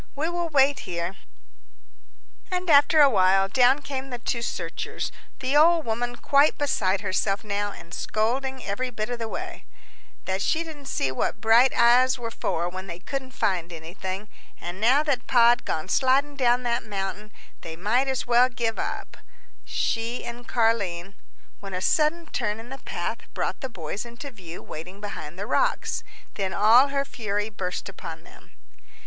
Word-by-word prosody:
"We 305 +4 -1
will 345 -1 -2
wait 280 -2 +4
here." 170 +1 -2 1.4
And 365 -2 0
after 290 +2 +6
a 285 - +8
while, 195 -1 +4
down 260 +6 +4
came 270 -1 -5
the 245 - -4
two 235 0 -2
searchers 235 - -4 0.3
the 265 +2 0
old 325 +2 +5
woman 240 +2 -2
quite 280 +4 +3
beside 200 -9 +1
herself 195 +1 0
now, 205 -1 -2
and 170 -3 -12
scolding 260 +4 -1
every 250 +6 -2
bit 220 -1 -4
of 240 - -3
the 225 - -3
way, 355 +8 -6 0.6
"that 190 +1 -1
she 325 +9 +1
didn't 300 -4 -10
see 135 - 0
what 130 - -1
bright 230 +4 +5
eyes 250 +2 +5
were 230 -2 -5
for 170 -6 -2
when 185 +2 -6
they 170 -2 -6
couldn't 265 +8 -5
find 180 -6 0
anything 185 +5 -6 0.3
an' 175 +2 -6
now 255 +7 +4
that 275 -5 -1
Pa'd 240 -1 +5
gone 155 - -2
sliding 280 +2 +2
down 250 -2 +2
that 235 -1 0
mountain, 205 0 -5 0.3
they 165 -1 -7
might 220 +10 +1
as 265 -1 -1
well 245 +1 +5
give 235 -3 -2
up, - - -4 0.5
she 230 +2 -2
an' 240 0 -7
Car'line" 200 -7 0 0.5
when 195 -2 -6
a - - -1
sudden 310 - +2
turn 225 -7 -2
in 230 +2 -10
the 270 +1 -7
path - - -4 0.2
brought - - -2
the 265 - -4
boys 190 -1 -5
into 240 +4 -9
view 180 -7 -10
waiting 180 +5 -8
behind 175 -6 -7
the 200 - -4
rocks. - - 0 0.3
Then 190 -2 -2
all 230 +6 +6
her 275 0 -1
fury 215 -4 -3
burst 185 -3 -4
upon 165 -4 -8
them. - - -18
235 Hz, 170 wpm, -25 LUFS, 195-265 Hz, 1.4 s, a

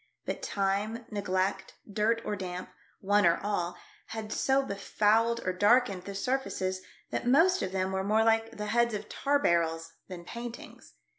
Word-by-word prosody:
But - - -3
time, 205 +4 -1
neglect, 190 -1 -1
dirt 215 +3 0
or 210 - -1
damp 185 -2 -6 0.2
— - - -36
one 205 +1 +3
or 170 0 +4
all 180 -4 -2
— - - -28
had 220 -1 -5
so 270 0 +2
befouled 220 +1 +1
or 185 - 0
darkened 205 -1 +3
the 200 - -6
surfaces 195 -6 -2 0.3
that - - -2
most 340 +9 +5
of 185 - -2
them 190 0 -1
were 190 0 -1
more 215 +3 +3
like 225 0 +1
the 210 - -3
heads 235 +1 +2
of 210 0 -6
tar 285 +1 +1
barrels 165 - 0
than 175 -2 -8
paint 235 +2 -6
ings. - - -14
205 Hz, 175 wpm, -29 LUFS, 190-230 Hz, 0.3 s, most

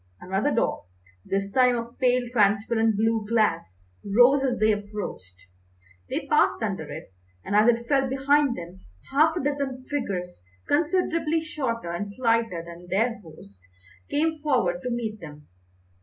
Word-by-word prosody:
Another 195 +8 -1
door, 230 - -1 0.4
this 195 0 -2
time 250 +1 +4
of 235 +1 -7
pale 250 -1 +2
transparent 220 0 +2
blue 225 0 +1
glass, 170 - +1 0.3
rose 245 +7 +5
as 265 -2 0
they 215 0 +3
approached; 200 - -6 0.6
they - - -3
passed - - +2
under - - -3
it, - - -9 0.3
and 200 - -2
as 215 +3 +6
it 235 0 0
fell 270 -1 +2
behind 275 0 +2
them 175 +2 -9 0.3
half 310 +4 +4
a 350 - -2
dozen 275 -3 -2
figures, 180 - -3 0.3
considerably 325 0 +1
shorter 255 - -3
and 200 +4 -4
slighter 230 -6 0
than 170 +1 -11
their 230 +4 0
host, 100 - -15 0.5
came 315 +2 0
forward 240 -13 0
to 250 - -3
meet 225 -3 -3
them. 150 -4 -11
230 Hz, 145 wpm, -25 LUFS, 195-270 Hz, 0.6 s, as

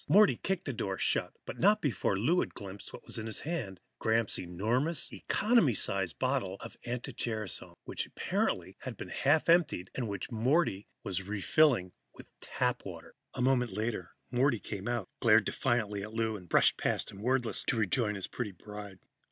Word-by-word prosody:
Morty 205 +1 +6
kicked 190 -2 -2
the 135 - -2
door 95 -4 -3
shut, - - +1
but - - -7
not 205 +4 +5
before 110 -7 0
Lou 160 - +3
had - - -2
glimpsed 100 0 -8
what - - -11
was - - -1
in 110 - -5
his 110 - 0
hand 125 - -4 0.2
Gramps' 110 0 +2
enormous 115 - 0
economy 210 - +2
size 95 -2 +4
bottle 130 - -1
of - - -8
anti 120 0 -4
gerasone, 110 -5 -2
which - - -3
had - - -20
apparently - - -1 0.2
been - - -7
half 145 +3 +2
emptied, 165 - +3
and 125 -3 -2
which 100 +4 -5
Morty 120 - +1 0.2
was 95 0 -3
refilling 105 - +3 0.2
with - - -14
tap 125 -1 -1
water. 85 -4 -9 0.2
A 125 - -1
moment 125 -2 +2
later, 105 -5 -3 0.2
Morty 125 0 +3
came 100 +1 -6
out, 120 -5 -1
glared 115 -2 +5
defiantly 110 -6 0
at 105 +2 -7
Lou 110 -1 0
and 90 -4 -10
brushed - - +4
past - - -1
him 100 - -11
wordlessly 125 0 +1
to - - +1
rejoin 110 0 +1
his 95 - -3
pretty 120 -5 -4
bride. 105 +1 -9
115 Hz, 180 wpm, -31 LUFS, 100-130 Hz, 0.2 s, Morty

